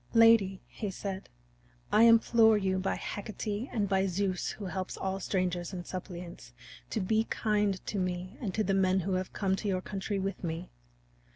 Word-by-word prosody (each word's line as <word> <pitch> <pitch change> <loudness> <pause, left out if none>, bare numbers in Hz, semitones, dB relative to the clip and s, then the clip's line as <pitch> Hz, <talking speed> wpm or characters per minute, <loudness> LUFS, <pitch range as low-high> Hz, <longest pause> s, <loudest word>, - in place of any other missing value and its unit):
"Lady," 225 -5 +5
he 210 - -5
said, 190 0 -5 0.6
"I 220 +2 +7
implore 225 -1 +6
you 190 -2 0
by 190 - 0
Hecate 210 +3 -4
and 210 -3 0
by 190 0 +2
Zeus 185 0 -1
who 210 - -6
helps 185 0 -4
all 190 0 -2
strangers 180 -2 -1
and 175 -1 -5
suppliants 175 - -7 0.4
to - - -1
be 220 +4 +1
kind 210 -4 0
to 205 - -2
me 180 +2 -3
and 210 -6 -2
to 215 - +2
the 195 - 0
men 190 0 +3
who 190 +3 -2
have 185 0 -1
come 190 -2 0
to 210 - -4
your 185 -2 0
country 200 0 -3
with 195 0 -3
me. 165 +1 -4
195 Hz, 180 wpm, -30 LUFS, 185-210 Hz, 0.6 s, I